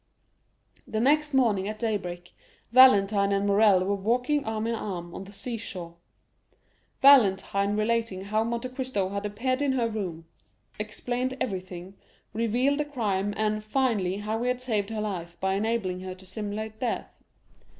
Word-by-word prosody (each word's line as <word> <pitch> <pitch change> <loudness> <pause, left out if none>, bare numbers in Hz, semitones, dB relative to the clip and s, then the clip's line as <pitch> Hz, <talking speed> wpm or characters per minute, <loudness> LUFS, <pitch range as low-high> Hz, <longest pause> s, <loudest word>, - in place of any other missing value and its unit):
The 215 - -2
next 295 +5 +3
morning 225 -8 +2
at 215 0 -4
daybreak, 180 -6 -3 0.4
Valentine 205 -5 +6
and 200 0 +1
Morrel 200 -2 +5
were 200 - +1
walking 245 +8 +1
arm 220 0 -2
in 230 - 0
arm 175 -6 -5
on 190 - -7
the 195 - -12
seashore, 200 -6 -6 1.1
Valentine 200 -6 +5
relating 220 -3 0
how 215 +2 0
Monte 235 +2 -3
Cristo 255 -7 -2
had 200 +1 -3
appeared 255 +6 -1
in 280 -2 +2
her 240 -3 +1
room, 185 -7 -5 0.5
explained 245 +4 -3
everything, 185 -3 -5 0.4
revealed 240 +6 +1
the 300 - 0
crime, 205 -8 -1
and, 215 0 0
finally, 215 -6 0
how 215 +2 -3
he 245 - -1
had 250 0 0
saved 220 -5 -1
her 220 -1 -3
life 175 -5 -5
by 190 0 0
enabling 200 -3 -1
her 185 0 -6
to 190 0 -13
simulate 215 +2 -5
death. 245 -3 -4
215 Hz, 150 wpm, -27 LUFS, 195-240 Hz, 1.1 s, Valentine